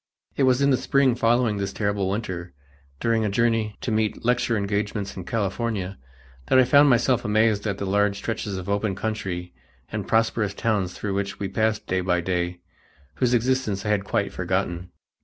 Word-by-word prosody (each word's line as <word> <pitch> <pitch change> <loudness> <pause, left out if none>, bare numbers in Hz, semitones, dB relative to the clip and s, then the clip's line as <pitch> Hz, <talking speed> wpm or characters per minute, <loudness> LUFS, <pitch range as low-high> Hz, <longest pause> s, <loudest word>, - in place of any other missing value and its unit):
It - - -1
was 130 +2 +2
in 140 - +4
the 130 - +4
spring 140 -1 +2
following 115 -2 +2
this 100 -1 -2
terrible 100 -2 -1
winter, 95 -5 -4 0.5
during 115 -1 +1
a 105 - +1
journey 115 0 +1
to 125 - -2
meet 110 +1 -1
lecture 120 -1 +2
engagements 100 0 -2
in 95 - -7
California, 100 - -2 0.5
that - - +4
I 130 - +7
found 140 +3 +6
myself 125 0 +3
amazed 110 0 +2
at 100 -2 -1
the 100 - -3
large 100 +1 +1
stretches 105 -2 -3
of 90 - -6
open 100 0 0
country 95 -4 -4 0.4
and 105 -2 -4
prosperous 110 -2 +1
towns 100 -6 -1
through 100 -2 -3
which 100 0 -3
we 100 - -3
passed 110 +1 0
day 95 0 0
by 90 -1 +1
day, 90 0 -2 0.6
whose 125 -1 +2
existence 120 -5 0
I - - -1
had 105 -2 +1
quite - - -1
forgotten. 85 +1 -2
105 Hz, 180 wpm, -24 LUFS, 95-115 Hz, 0.6 s, I